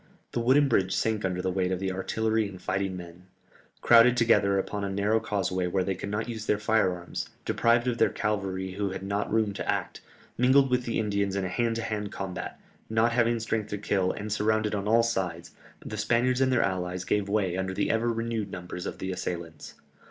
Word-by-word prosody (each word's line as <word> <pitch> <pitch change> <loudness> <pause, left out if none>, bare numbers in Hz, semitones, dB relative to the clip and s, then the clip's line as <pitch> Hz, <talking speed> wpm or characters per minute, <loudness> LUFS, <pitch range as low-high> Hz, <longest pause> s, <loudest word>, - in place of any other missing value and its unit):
The - - -1
wooden 135 +5 +4
bridge 95 -7 +2
sank 110 -2 0
under 90 -1 -1
the 95 - 0
weight 90 0 0
of 95 - 0
the 95 0 -1
artillery 110 +3 0
and 95 -2 -10
fighting 95 0 -2
men. 90 +1 -11 0.5
Crowded 120 +1 +6
together 105 -4 +4
upon 100 +1 -2
a 100 - -1
narrow 100 +3 +1
causeway 95 -4 -1
where 95 +1 0
they 95 - -1
could 95 +2 -6
not 105 +3 -2
use 110 -2 -5
their 105 - +3
fire 110 -2 +2
arms, 90 0 -6 0.2
deprived 120 +1 +2
of 120 -2 -1
their - - +5
cavalry 95 -3 -2
who 100 +1 -2
had 95 0 -6
not 100 +1 -2
room 110 -2 +1
to - - -1
act, - - -3 0.4
mingled 130 +1 +5
with 125 -1 +1
the 115 - -1
Indians 100 -2 0
in 100 -1 -1
a - - -2
hand 115 +4 0
to 115 - -3
hand 105 -2 -3
combat, 95 -2 -5 0.3
not 110 +1 +3
having 120 -1 +2
strength 110 -1 -2
to 105 - -3
kill, 95 -2 0
and 105 0 -4
surrounded 110 0 +1
on 100 0 -2
all 115 +2 +5
sides, 90 -7 -2 0.3
the 110 - -5
Spaniards 120 +4 +2
and 130 0 +3
their 125 - +3
allies 90 -1 -2
gave 100 +1 0
way 100 -4 +1
under 95 0 -2
the - - +1
ever 115 +1 +1
renewed 115 -2 -2
numbers 90 -1 -6
of - - -5
the 95 - -4
assailants. 85 -3 -5
105 Hz, 215 wpm, -28 LUFS, 95-115 Hz, 0.5 s, Crowded